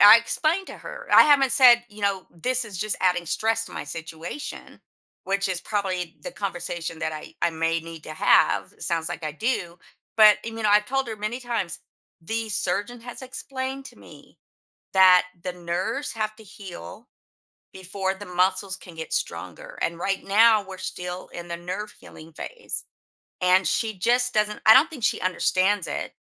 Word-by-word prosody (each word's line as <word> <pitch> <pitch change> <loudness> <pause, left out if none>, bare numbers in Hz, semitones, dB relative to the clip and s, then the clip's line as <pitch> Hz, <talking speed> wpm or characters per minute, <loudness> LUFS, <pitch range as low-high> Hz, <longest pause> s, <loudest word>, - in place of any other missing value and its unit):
I 210 +3 +10
explained 320 +10 0
to - - -8
her - - -9
I - - +10
haven't 275 -4 +4
said, 240 -2 +7
you 210 -1 -13
know, 195 -2 0
"This 250 +8 -1
is 205 -5 -8
just 215 +2 -1
adding 180 -1 +2
stress 225 +6 0
to - - -12
my - - -5
situation," 165 - -8 0.4
which 195 0 0
is 180 -2 -2
probably 185 -5 -3
the 270 - -5
conversation 175 -4 -4
that 160 - -2
I 155 +1 -9
I - - +4
may 165 0 0
need 165 -1 -10
to 155 - -7
have, - - +3
it - - -14
sounds 165 -1 -1
like 175 -2 -6
I 155 - -3
do, 180 - -2 0.4
but 215 -1 +8
e 230 - -4
mean, 225 -1 -6
know, - - +4
I've 210 0 +5
told 270 0 -1
her 220 - -5
many 215 +4 -4
times, 230 -9 -3 0.4
"The 225 +6 -3
surgeon 210 +4 -2
has 245 +2 -9
explained 265 +1 -5
to - - -14
me - - -16 0.6
that 185 -1 +7 0.2
the 180 - -2
nerves 180 +11 -3
have 215 -1 -3
to 220 - -13
heal 185 - -10 0.7
before 190 +1 -3
the 205 +1 -10
muscles 185 +2 0
can 180 -2 -13
get 160 0 -7
stronger. 85 0 -4
And 170 0 -1
right 195 +2 -1
now, 215 +2 +5
we're 190 -1 -9
still 180 0 -6
in 175 0 -9
the 170 - -4
nerve 185 +5 -5
healing 160 +1 -14
phase." 475 - -6 0.6
And 185 +1 +4
she 220 -3 0
just 245 +6 +2
doesn't 210 0 0
I 220 - +10
don't 295 +8 +6
think 290 -8 -9
she - - +1
understands 185 +1 +1
it - - -4
195 Hz, 185 wpm, -25 LUFS, 175-230 Hz, 0.7 s, I